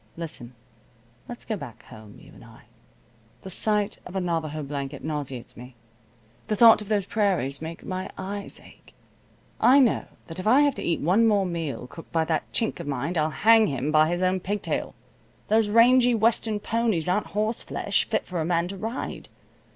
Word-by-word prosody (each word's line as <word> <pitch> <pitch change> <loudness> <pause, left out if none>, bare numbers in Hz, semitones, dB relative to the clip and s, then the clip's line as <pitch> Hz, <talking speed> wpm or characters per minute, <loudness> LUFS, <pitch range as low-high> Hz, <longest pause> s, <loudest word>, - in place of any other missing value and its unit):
Listen. 140 -7 -7 0.7
Let's 240 - -8
go 220 - -2
back 140 - -10
home, 110 -1 -13
you - - -16
and - - -15
I. - - -16 0.8
The 190 - -8
sight 210 +1 0
of 180 - -11
a - - +1
Navajo 160 -4 -2
blanket 140 -2 -5
nauseates 145 -5 -5
me. 125 +1 -12 0.7
The 215 - 0
thought 225 0 +7
of 210 - -8
those 205 -2 0
prairies 185 - 0
makes 165 +1 -7
my 185 0 -4
eyes 200 +1 -5
ache. - - -19 0.6
I 265 - +6
know 255 -6 +3 0.2
that 165 +1 -7
if 185 - -4
I 255 +6 +6
have 290 -1 +3
to - - -6
eat 170 - -1
one 195 +9 +3
more 205 -3 +3
meal 165 -9 -4
cooked 165 +6 -12
by 165 -1 +1
that 160 -1 -2
Chink 225 - 0
of - - -7
mine 140 +5 -2
I'll 155 -1 +1
hang 225 +6 +5
him 140 +1 -2
by 155 +1 +4
his 175 +1 -1
own 185 +1 +1
pigtail. 205 +3 -3 0.5
Those 220 -1 +3
rangy 245 +2 +5
western 220 -1 +1
ponies 220 -7 0
aren't 185 +4 0
horseflesh, 215 +2 0
fit - - 0
for 175 -2 -3
a - - 0
man 170 +1 0
to 195 - -6
ride. 225 +6 -5
185 Hz, 185 wpm, -25 LUFS, 155-215 Hz, 0.8 s, thought